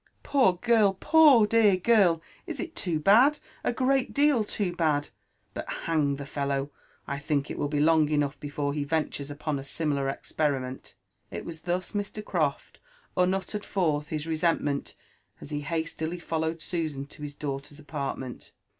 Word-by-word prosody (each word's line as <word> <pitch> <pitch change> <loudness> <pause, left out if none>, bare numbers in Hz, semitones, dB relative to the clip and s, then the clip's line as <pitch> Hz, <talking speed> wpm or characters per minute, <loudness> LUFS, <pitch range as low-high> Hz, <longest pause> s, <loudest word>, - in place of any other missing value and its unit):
'' - - -41
Poor 260 -10 +4
girl 210 0 +3
1— - - -34
poor 300 -8 +6
dear 210 -3 +4
girl 190 -3 +4
Ir— 160 - -18 0.3
it - - -5
is 345 - -3
too 170 -4 -1
bad, 240 - +6 0.3
a - - +1
great 260 +1 +1
deal 285 -5 +4
too 195 -4 -2
bad; 150 -4 +1 0.2
— - - -44
but, - - -6
hang 150 -4 +1
the 140 0 -7
fellow! 140 0 -2 0.3
I 140 0 -3
think 140 0 -1
it - - -5
will - - 0
be 145 0 -1
long 155 0 +4
enough 145 -2 0
before 145 -1 -3
he 145 -1 -1
ventures 145 -1 -2
upon 145 0 -3
a - - -7
similar 140 -1 -1
experiment." 135 -2 -3 0.3
It - - -6
was 160 -2 -7
Jbus 185 +4 -3
Hr. - - -3
Croft 155 -8 -2 0.4
muttered 190 +3 0
forth 155 -6 0
his 155 -1 -3
resentment 160 -3 0 0.4
as - - -11
he 145 0 -2
hastily 160 +2 -3
followed 160 -1 -2
Susan 155 -6 -2
to 145 - -15
his 145 -1 -6
daughter's 145 0 -5
apartment. 140 -4 -6
160 Hz, 170 wpm, -27 LUFS, 145-190 Hz, 0.4 s, poor